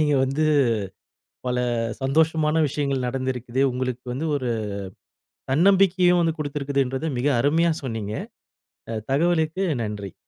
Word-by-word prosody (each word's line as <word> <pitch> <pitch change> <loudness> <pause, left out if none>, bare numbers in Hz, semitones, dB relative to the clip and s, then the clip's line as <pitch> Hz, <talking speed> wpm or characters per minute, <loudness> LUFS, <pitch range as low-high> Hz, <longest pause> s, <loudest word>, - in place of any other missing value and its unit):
நீங்க 150 -1 +3
வந்து 140 +4 0 1.0
பல 125 0 0 0.4
சந்தோஷமான 155 +3 +2
விஷயங்கள் 140 -3 -1
நடந்திருக்குது. 130 0 -2
உங்களுக்கு 125 -1 -3
வந்து 140 +6 -3
ஒரு 125 -3 -3 1.0
தன்னம்பிக்கையும் 180 +1 +4
வந்து 165 0 0
குடுத்திருக்கின்றது 140 -1 -1
மிக 140 - +1
அருமையா 160 +5 +3
சொன்னீங்க. 110 -4 -4 0.8
அ 110 -1 -3
தகவலுக்கு 165 +4 +1 0.2
நன்றி. 105 -3 -5
140 Hz, 105 wpm, -24 LUFS, 125-160 Hz, 1.0 s, தன்னம்பிக்கையும்